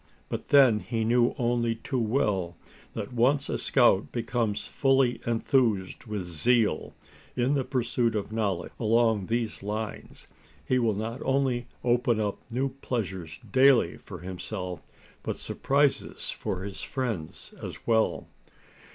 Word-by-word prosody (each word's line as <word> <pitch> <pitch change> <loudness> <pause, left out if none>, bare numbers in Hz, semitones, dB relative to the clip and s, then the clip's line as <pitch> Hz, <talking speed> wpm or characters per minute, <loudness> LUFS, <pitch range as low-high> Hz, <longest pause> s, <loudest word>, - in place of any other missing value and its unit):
But - - -4
then, 130 -6 +6
he 115 +1 -2
knew 120 +1 +3
only 120 -1 +1
too 125 +3 -3
well 105 -7 0 0.4
that - - -5
once 135 +4 +2
a - - -1
scout 120 -7 +3
becomes 115 -3 -1
fully 135 -3 +2
enthused 115 -5 +1
with 105 -4 -3
zeal 105 +2 +1 0.4
in 125 +3 +2
the 140 -2 +1
pursuit 120 -3 0
of 105 0 -3
knowledge 105 -6 -1
along 110 -3 +2
these 115 -1 -1
lines 105 +2 -5 0.4
he 130 - +2
will 115 -4 +1
not 115 +4 -4
only 130 -3 +1 0.2
open 120 -2 +2
up 105 -2 -1
new 130 +3 0
pleasures 95 - -4
daily 130 -8 +5
for 90 -4 -10
himself, 90 -1 -5 0.4
but - - -3
surprises 140 0 0
for 95 0 -4
his 100 -1 -6
friends 115 - -4
as - - -8
well. 110 -1 +1
115 Hz, 135 wpm, -28 LUFS, 105-125 Hz, 0.4 s, then